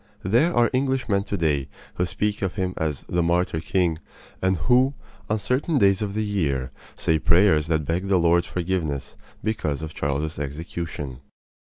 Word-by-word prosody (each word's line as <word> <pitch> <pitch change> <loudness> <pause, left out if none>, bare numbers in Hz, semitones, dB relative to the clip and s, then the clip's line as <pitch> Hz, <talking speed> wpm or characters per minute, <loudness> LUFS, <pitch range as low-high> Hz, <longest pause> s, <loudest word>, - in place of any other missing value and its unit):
There 120 - +3
are 120 -1 +4
Englishmen 130 -7 +1
to 100 -1 -2
day 75 -5 0 0.2
who 90 - -1
speak 105 +3 -1
of 95 -2 -1
him 95 -2 -1
as 75 -3 -2
"the 90 - +1
martyr 85 -1 +1
king," 85 -1 0 0.4
and 95 0 +2
who, 130 - +3 0.3
on 110 - +2
certain 130 - 0
days 100 -4 +4
of 100 -1 -2
the 110 0 0
year, 70 -11 -1 0.2
say 80 -1 +1
prayers 85 -2 +4
that 80 -2 0
beg 90 +5 -1
the 95 -1 +3
Lord's 85 0 +3
forgiveness 85 -6 -2 0.3
because 80 -9 -1
of 80 0 -6
Charles's 70 +3 -2
execution. 75 -2 -5
90 Hz, 165 wpm, -24 LUFS, 80-105 Hz, 0.4 s, are